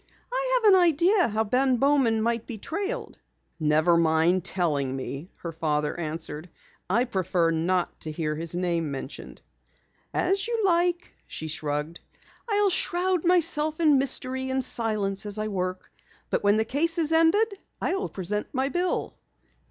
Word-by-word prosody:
"I - - +1
have 420 -2 +7
an 375 - +6
idea 350 +3 +4
how 220 0 0
Ben 255 +3 +2
Bowman 265 -5 +2
might 230 0 -1
be 230 - -6
trailed!" 400 - -5 0.4
"Never 155 +2 +3
mind 165 +2 +2
telling 150 -8 -1
me," 140 +5 -6
her 170 - -4
father 150 -2 -1
answered. 160 0 -5 0.4
"I 235 +6 +2
prefer 185 -6 0
not 175 +2 -1
to 155 - -6
hear 155 -1 -2
his 165 +2 -3
name 170 -3 -1
mentioned." 135 0 -8 0.7
"As 390 +3 0
you 460 -2 -1
like," 350 0 +1
she 160 - -6
shrugged. 150 +1 -3 0.5
"I'll 410 -2 +3
shroud 360 0 0
myself 330 -3 +3
in 300 -5 +5
mystery 260 0 -1
and 260 0 0
silence 210 -5 -1
as 205 0 -3
I 215 0 -2
work. 185 -2 -4 0.4
But - - 0
when 205 +1 +4
the 220 - +1
case 330 +8 0
is 325 -2 +2
ended, 385 +6 +3 0.2
I'll 385 +2 -1
present 205 +3 -3
my 265 0 0
bill!" 355 +3 -1
225 Hz, 150 wpm, -26 LUFS, -, 0.7 s, have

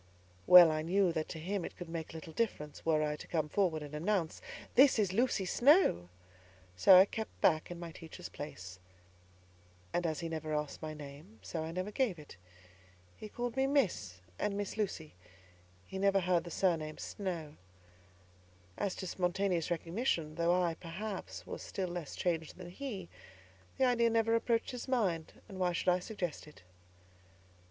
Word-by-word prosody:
Well 175 -2 +10
I 155 0 -1
knew 180 +3 +2
that 160 -1 -2
to 165 - -6
him 185 +4 -3
it - - -7
could 175 - -7
make 165 -1 -6
little 160 0 -8
difference, 150 -10 -3
were 155 -2 +2
I 150 0 -1
to - - -10
come 155 -3 0
forward 160 -2 0
and 145 0 -9
announce, 170 +1 -1 0.3
"This 270 0 +6
is 200 -4 +1
Lucy 230 -3 +1
Snowe!" 240 - +4 0.7
So 185 - +8
I 190 - +9
kept 220 +2 -6
back 155 -2 +3
in 175 -1 -7
my 170 -1 -6
teacher's 160 0 -9
place; 90 -11 -8 1.1
and 175 -1 +1
as 155 0 -2
he 165 - -3
never 155 -1 -3
asked 150 -1 -3
my 155 -1 -5
name, 150 +8 -11
so 160 -2 -4
I 160 - -5
never 185 +4 -3
gave 220 -6 0
it. 150 - -12 0.8
He 215 - -8
heard - - -20
me - - -27 0.2
called - - -16
"Miss," 110 - 0 0.2
and 200 -1 -1
"Miss 205 -1 -3
Lucy;" 195 -7 -3 0.7
he 190 - -6
never 195 0 +3
heard 180 -1 +1
the - - -6
surname, 160 -3 0
"Snowe." 170 -7 -5 1.3
As 200 -2 -1
to 190 - -5
spontaneous 180 -1 0
recognition—though 170 -2 0
I, 170 -1 +1
perhaps, 185 +5 -6
was - - -6
still 185 -2 -4
less 175 -4 -5
changed 165 -3 -2
than 175 -1 -9
he—the 95 - -6
idea 235 -2 +3
never 225 0 +2
approached 230 +1 +1
his 250 0 -6
mind, 190 -11 0
and 195 -4 -9
why 180 -1 +1
should 175 - +1
I 180 0 +3
suggest 180 -6 -5
it? 150 - -16
175 Hz, 170 wpm, -33 LUFS, 155-200 Hz, 1.3 s, Well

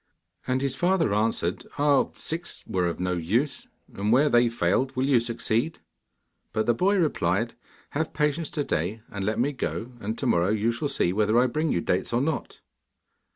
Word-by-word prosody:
And 130 +1 +1
his 135 -2 0
father 175 - +2
answered, 105 -5 0
'Ah, 145 -1 +4
six 170 +2 -4
were 90 -2 0
of 85 - -3
no 90 0 0
use, 110 - -1 0.3
and 105 +2 -1
where 140 +5 +5
they 120 -1 +4
failed, 115 +4 0
will 130 +1 +1
you 135 -3 +4
succeed?' 115 +5 -1 0.8
But 110 - 0
the 120 - +3
boy 195 - +2
replied: 115 - +1 0.4
'Have 155 +2 -1
patience 150 +1 0
to 145 - +2
day, 105 - -2
and 100 -1 -4
let 110 +2 0
me 130 +5 +1
go, 125 -2 -4
and 110 +2 -4
to - - -3
morrow 90 -6 +3
you 110 +2 +1
shall 140 +5 -2
see 90 -10 +1
whether 105 +2 +2
I 125 - +5
bring 155 +5 0
you 85 - +1
dates 95 +6 -1
or 120 - +2
not. 150 +1 -3
120 Hz, 190 wpm, -26 LUFS, 105-145 Hz, 0.8 s, where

